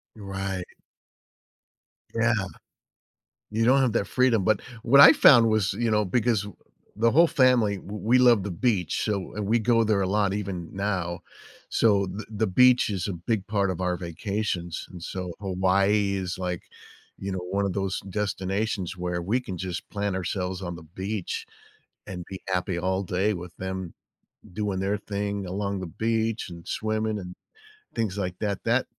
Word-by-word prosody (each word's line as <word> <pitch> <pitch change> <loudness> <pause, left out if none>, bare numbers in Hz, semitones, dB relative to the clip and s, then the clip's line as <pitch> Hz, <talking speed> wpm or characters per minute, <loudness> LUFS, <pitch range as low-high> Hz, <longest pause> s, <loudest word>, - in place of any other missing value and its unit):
Right. 95 -3 -4 1.4
Yeah. 115 +1 +2 1.2
You 110 +2 +1
don't 130 +3 +5
have 130 -4 +2
that 105 -3 0
freedom, 125 -6 +2
but 110 0 +2 0.2
what 140 +4 +6
I 160 +3 +11
found 120 -7 +7
was, 110 -3 +2
you 115 +2 0
know, 105 -1 +2
because 110 0 +1 0.5
the 115 +2 +3
whole 170 +4 +6
family, 125 -8 +3
w 100 +3 -8
we 120 +4 +4
love 120 -5 +5
the 100 - -4
beach, 95 -1 0
so, 100 -4 -2
and 105 -1 -2
we 115 +3 +3
go 115 0 +3
there 105 -2 +2
a - - 0
lot 100 0 +1
even 95 -5 -4
now. 95 -3 -2 0.5
So 100 -4 +3
the 95 +4 -6
the 110 +1 0
beach 125 +5 +5
is 95 -3 -2
a 100 - -2
big 95 +4 -2
part 100 -2 +1
of 90 -1 -4
our 90 -1 0
vacations, 90 0 -3
and 90 -2 -10
so 90 0 -5
Hawaii 100 +1 +2
is, 95 -1 -3
like, 90 -2 -3 0.6
you 100 - -4
know, 95 - -2
one 100 +1 0
of 95 - -1
those 95 0 -2
destinations 100 -1 -2
where 90 -1 -2
we 110 +9 +1
can 95 -7 -6
just 90 -1 -5
plant 100 -2 -2
ourselves 90 0 -3
on 85 -1 -4
the 85 - -11 0.2
beach 100 -2 -3 0.6
and 90 -2 -6
be 95 -1 -6
happy 90 -1 -1
all 95 +2 0
day 95 +3 0
with 90 -2 -8
them 95 -2 -5 0.6
doing 100 -1 -2
their 100 +2 0
thing 100 -1 -3
along 100 +1 -3
the 95 - -4 0.2
beach 115 -1 0
and 85 0 -10
swimming 110 0 -1
and 90 -2 -8 0.6
things 110 -4 -2
like 90 -2 -2
that, 100 -3 -1
that 120 +3 +2
100 Hz, 170 wpm, -26 LUFS, 95-110 Hz, 1.4 s, I